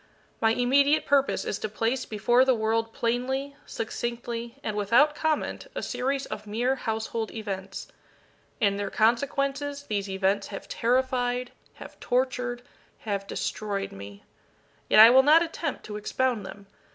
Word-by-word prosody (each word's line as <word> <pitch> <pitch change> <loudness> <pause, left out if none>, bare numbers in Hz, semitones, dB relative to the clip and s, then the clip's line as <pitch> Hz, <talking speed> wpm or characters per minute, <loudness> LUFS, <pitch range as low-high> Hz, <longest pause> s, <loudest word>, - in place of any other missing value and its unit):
My 225 - +4
immediate 280 +5 +3
purpose 280 -1 +2
is 205 - -3
to 215 - -3
place 230 +4 -1
before 235 +4 +3
the 260 -1 +3
world 225 0 0
plainly, 260 +5 -2
succinctly, 235 +1 -5
and 215 - -3
without 235 +9 +4
comment, 315 +9 -2
a - - -3
series 270 +2 -2
of 210 - -7
mere 240 +5 0
household 225 -2 -3
events. 195 -3 -6 0.7
In 200 -2 +2
their 205 - -3
consequences 275 +5 0
these 205 -6 -3
events 190 +1 0
have 200 - -8
terrified 250 0 0 0.2
have - - -12
tortured 250 -1 -1 0.4
have 200 -2 -3
destroyed 200 -2 -3
me. 100 +1 -11 0.7
Yet - - +6
I 225 +2 +11
will 260 +1 +8
not 310 +5 +6
attempt 330 0 -4
to 210 -1 -6
expound 225 -1 -1
them. 200 +1 -11
235 Hz, 140 wpm, -27 LUFS, 210-265 Hz, 0.7 s, I